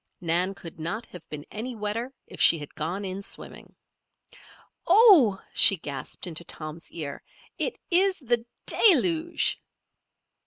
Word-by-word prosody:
Nan 180 +3 0
could 165 -3 -11
not 190 +9 -4
have 180 - -14
been 150 -1 -7
any 235 +4 -6
wetter 220 +4 -4
if - - -9
she 165 - +6
had 145 -2 -9
gone 175 +6 -4
in 190 +1 -5
swimming. - - -7 1.1
"Oh!" 345 - +6
she 195 - +7
gasped 140 -5 -7
into 170 -1 -4
Tom's 155 0 -9
ear. 150 -4 -6 0.4
"It - - -1
is 375 +2 +3
the 240 -4 -1 0.2
deluge!" 340 - +2
195 Hz, 130 wpm, -26 LUFS, 165-255 Hz, 1.1 s, she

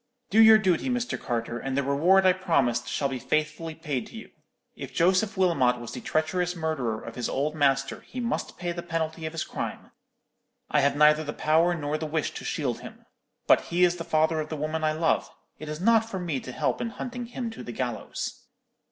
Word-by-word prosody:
Do 220 +3 +6
your 220 0 +9
duty, 190 +2 +1
Mr. 245 0 -2
Carter; 120 0 -3
and 135 0 -3
the 140 - +2
reward 170 +8 +4
I 185 - +6
promised 140 -11 +1
shall 140 - 0
be 130 -2 -4
faithfully 155 +3 -2
paid 140 -8 -3
to - - -11
you. - - -10 0.4
If - - -8
Joseph 190 +4 +2
Wilmot 140 -10 +3
was 120 -1 -7
the - - -6
treacherous 180 +3 0
murderer 145 -9 -2
of 115 - -8
his 120 0 -3
old 145 +3 -1
master, 135 -3 +1
he 255 - -8
must 235 -1 -3
pay 175 0 -3
the 170 0 -4
penalty 160 -1 -3
of 155 - -7
his 165 - -2
crime; - - -6 0.8
I 150 - +4
have 140 +1 +2
neither 150 +1 +5
the 150 -1 -5
power 165 +3 +2
nor 150 -1 -2
the 155 - -3
wish 155 0 -1
to - - -8
shield - - -2
him. - - -12 0.4
But - - +4
he 175 +1 +1
is 175 0 +3
the 165 - -4
father 160 0 +2
of 155 0 -3
the 155 - -4
woman 155 +2 -2
I 155 0 +2
love. 160 +1 +1 0.3
It 155 - -7
is 150 0 -5
not 225 +3 +3
for 195 - -4
me 170 -7 -2
to 130 - -8
help - - -1
in 235 - -2
hunting 245 +1 -6
him 240 -1 -4
to 225 - -9
the - - -6
gallows.' 120 0 -4
160 Hz, 220 wpm, -27 LUFS, 140-180 Hz, 0.8 s, your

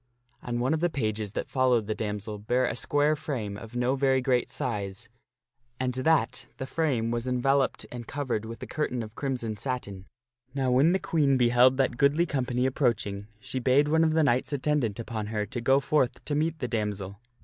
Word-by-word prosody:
And 120 -1 -3
one 130 +5 +1
of 160 - 0
the 175 +2 +2
pages 110 - -2
that - - -3
followed 125 -4 +2
the 110 - -1
damsel 105 0 -4
bare 125 +5 +1
a - - -2
square 145 +1 +2
frame 130 -10 -4
of 115 +3 -10
no 125 +2 +1
very 135 -1 +2
great 125 -1 +1
size, 100 -5 -4 0.7
and 130 -1 0
that 150 +5 +1
the 130 - -4
frame 130 -6 0
was 120 +1 -2
enveloped 135 +2 +1
and 120 -1 -7
covered 130 -7 -2
with 115 +1 -8
a - - -3
curtain 125 -6 -2
of 110 -1 -10
crimson 120 -4 -3
satin. 100 -5 -4 0.5
Now 130 -2 +1
when 140 +7 +4
the - - +3
Queen 150 -7 +2
beheld 125 +1 +5
that 130 -3 +1
goodly 145 +4 +3
company 125 -4 -1
approaching, 110 -7 0
she 130 - -4
bade 135 +4 +3
one 160 +1 +4
of 160 -1 +2
the 160 0 +3
knights 130 -1 +1
attendant 140 -6 0
upon 110 -2 -4
her 105 -1 -1
for - - -19
to 120 - -3
go 135 +3 +4
forth 140 -2 0
to 150 - -2
meet 160 +2 0
the 125 - -3
damsel. 105 -4 -3
125 Hz, 200 wpm, -27 LUFS, 110-140 Hz, 0.7 s, beheld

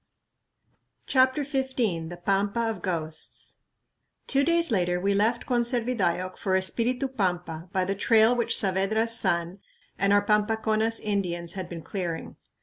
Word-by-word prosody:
CHAPTER 260 +2 +3
XV 265 -1 -3 0.3
The 175 0 -9
Pampa 200 +3 +1
of 200 -5 -8
Ghosts 160 -4 -4 0.7
Two 275 0 +2
days 335 -1 +2
later 180 -3 +1
we 200 +2 +1
left 220 +4 +1
Conservidayoc 235 -7 0
for 190 -1 0
Espiritu 240 +8 +2
Pampa 180 -8 -3
by 185 -1 0
the 195 - -1
trail 220 +4 +4
which 235 -1 0
Saavedra's 210 +4 +1
son 170 -3 0 0.4
and 200 +1 +2
our 205 0 +4
Pampaconas 220 +1 +1
Indians 175 -5 -2
had 185 -2 -6
been 165 -2 -7
clearing. 175 -3 -5
200 Hz, 135 wpm, -26 LUFS, 185-235 Hz, 0.7 s, trail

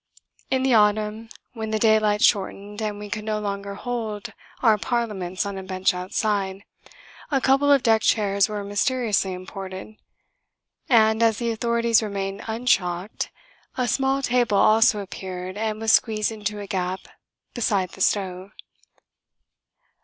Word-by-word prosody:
In 260 0 +1
the 265 -1 +3
autumn, 215 +1 +2 0.2
when 220 -2 -5
the 220 - 0
daylight 215 -1 +3
shortened 205 +1 +1
and 210 -1 -2
we 210 0 -7
could 210 +1 -4
no 215 0 -1
longer 200 -1 -4
hold 220 -3 -5 0.3
our 225 -3 +6
parliaments 205 -7 -2
on 200 -1 -4
a - - -7
bench 185 0 0
outside, 195 +1 -2 0.7
a 275 -4 +2
couple 275 +2 +3
of 275 -3 +5
deck 225 -1 +4
chairs 200 -2 +2
were 210 -1 -4
mysteriously 205 -1 0
imported; 190 +2 -8 0.9
and, 220 -2 +4
as 225 -2 +3
the 235 -1 -1
authorities 235 0 +2
remained 195 -2 -4
unshocked, 200 -5 -1 0.5
a 250 -1 0
small 270 +2 +1
table 240 -5 +2
also 215 -1 +4
appeared 185 -1 -7
and 215 0 -2
was 225 0 +2
squeezed 215 -1 +2
into 210 -1 -4
a 205 - -6
gap 185 -1 -2 0.5
beside 200 -6 0
the 190 - -11
stove. 190 0 -1
210 Hz, 140 wpm, -24 LUFS, 195-225 Hz, 0.9 s, our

